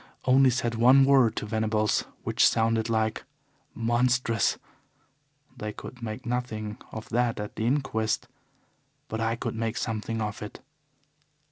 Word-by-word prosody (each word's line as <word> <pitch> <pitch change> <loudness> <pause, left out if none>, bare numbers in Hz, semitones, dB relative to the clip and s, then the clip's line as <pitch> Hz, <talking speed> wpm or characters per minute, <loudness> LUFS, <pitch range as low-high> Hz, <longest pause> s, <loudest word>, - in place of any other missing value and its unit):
Only 130 +1 +6
said 120 -1 0
one 130 +4 +6
word 135 -5 +4
to - - -3
Venables, 110 0 0 0.2
which - - +4
sounded 115 0 +1
like 110 -1 0 0.5
'Monstrous.' 120 -1 +1 1.0
They 105 -4 -5
could 125 +3 -10
make 110 -1 -6
nothing 115 -4 -3
of 110 - -7
that 120 -1 0
at 105 0 -6
the 110 - -1
inquest. 120 -5 0 0.8
But 110 - -3
I 115 0 +1
could - - -4
make 110 0 -2
something 110 +1 -3
of 105 -1 -3
it. 105 - -7
115 Hz, 135 wpm, -27 LUFS, 110-120 Hz, 1.0 s, Only